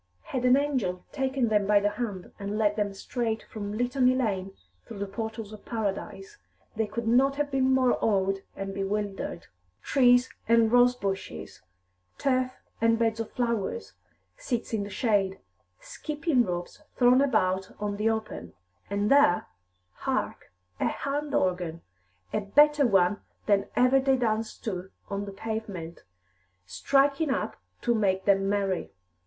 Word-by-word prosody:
Had 255 -1 -3
an 250 +1 +6
angel 255 -11 -1
taken 265 -3 0
them 210 -2 +2
by 205 0 +5
te 205 - +1
hand 205 -5 -5
and 200 +1 -3
led 210 -1 +2
them 205 -2 0
straight 220 +3 -3
from 210 -1 -6
Litany 250 +1 +2
Lane 195 -7 -1 0.3
through 225 - -10
the 200 - -2
portals 220 +1 -5
of 215 - -11
paradise, 230 - -4 0.4
they 220 -1 0
could 235 +1 -4
not 265 +4 +4
have 290 0 -1
been 265 -1 +2
more 260 -1 +4
awed 195 -2 +2 0.2
and 195 0 -5
bewildered. 195 -2 -3 0.4
Trees 245 -2 +4 0.2
and 230 -1 +4
rose 245 0 +5
bushes, 195 - -5 0.6
turf 255 -2 +1 0.3
and 230 0 +4
beds 225 -1 +1
of 225 - -3
flowers, 200 - -2 0.4
seats 240 -2 -3
in 220 - +1
the 200 - -5
shade, 200 -3 0 0.4
skipping 300 -4 0
ropes 175 - -5 0.2
thrown 250 +1 +5
about 190 -8 +1
on 205 -1 -2
the 215 +2 +2
open 220 - -4 0.4
and 205 +1 0
there, 280 -11 +5 0.5
hark, - - -3 0.3
a - - +1
hand 290 +1 -2
organ, 180 -3 -1 0.5
a - - +2
better 295 +7 +5
one 195 -1 +3 0.2
than 200 -2 +2
ever 255 +2 +5
they 270 0 +3
danced 225 -2 -2
to 190 -4 -4 0.2
on 200 0 -2
the 200 - -7
pavement, 195 -5 -5 0.6
striking 275 - +2
up 265 - -2 0.3
to 240 - +2
make 190 -4 +1
them 195 -1 +3
merry. 195 -3 -1
220 Hz, 150 wpm, -27 LUFS, 195-250 Hz, 0.6 s, an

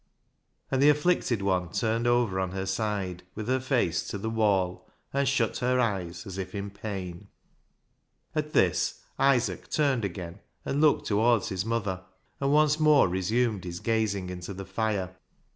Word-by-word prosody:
And 135 -1 +2
the 145 - +7
afflicted 150 - +2
one 90 -3 0
turned 115 +3 0
over 120 -6 +2
on 95 -1 -2
her 95 0 -3
side 95 -4 -2
with 110 0 -5
her 130 +1 +2
face 125 - +1
to - - -4
the 110 +3 -3
wall, 100 -5 +1 0.2
and 140 0 +1
shut 125 -5 +1
her 125 0 +1
eyes 90 -7 -1
as 95 -1 -6
if 95 +3 -5
in 100 0 -4
pain. 95 -2 -6 1.1
At 150 -1 -2
this 90 -3 +2 0.2
Isaac 135 -3 +2
turned 140 -6 +1
again 90 -1 -5 0.3
and 140 - 0
looked 155 -2 +4
towards 115 +1 +2
his 95 0 -2
mother, 100 -5 -2 0.4
and 140 0 +1
once 150 +1 +4
more 150 -5 +5
resumed 105 +3 0
his 85 -1 -5
gazing 105 -5 0
in 90 - -6
the 95 +2 -7
fire. 95 -2 -2
105 Hz, 160 wpm, -28 LUFS, 95-125 Hz, 1.1 s, the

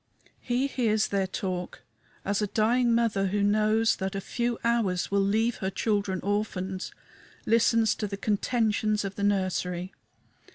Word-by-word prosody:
He 250 +2 0
hears 220 -6 +1
their 195 -1 0
talk, 180 -1 -4 0.4
as 200 +1 0
a 210 - 0
dying 235 +3 +2
mother, 215 -4 +1
who 200 +2 0
knows 215 +2 +2
that 190 0 -3
a - - -1
few 235 +3 -2
hours 225 -7 0
will 200 0 +3
leave 220 +4 +1
her 190 - -2
children 200 -2 -1
orphans, 190 -2 -2 0.5
listens 230 0 +3
to 210 - -2
the 200 0 -5
contentions 215 0 0
of 195 - -4
the 200 - -7
nursery. 185 -2 -1
205 Hz, 150 wpm, -27 LUFS, 195-225 Hz, 0.5 s, will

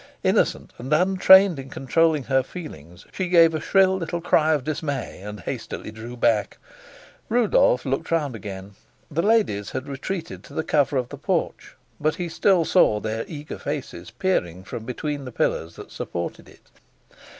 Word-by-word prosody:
Innocent - - +1
and 130 +4 -7
untrained 190 +1 +6
in 135 0 -8
controlling 155 +3 +1
her 130 +1 +2
feelings, 90 - -10
she 185 -2 -2
gave 165 -2 +6
a 155 - -2
shrill 190 -1 +4
little 170 -1 -3
cry 160 -2 +3
of 145 -4 0
dismay, 145 - -4
and 105 0 -8
hastily 110 - -6
drew 115 +3 -9
back. 115 -3 +1 0.7
Rudolf 220 - +3
looked 135 0 -2
round 150 -7 0
again. 100 -1 -8 0.4
The 160 +3 0
ladies 200 - +1
had 130 +2 -5
retreated 165 +5 -5
to - - -13
the 160 - -1
cover 145 -3 +1
of 125 -2 -2
the - - -8
porch, - - -2 0.2
but 155 +1 +1
he 175 -2 -4
still 180 0 +3
saw 110 - +4
their 110 +1 -3
eager 150 -2 -7
faces 130 - -5
peering 95 - -1
from 110 +3 -7
between 145 +3 -4
the 130 - -7
pillars 85 -6 -1
that - - -11
supported 85 -1 -5
it. - - -21
145 Hz, 165 wpm, -24 LUFS, 115-170 Hz, 0.7 s, untrained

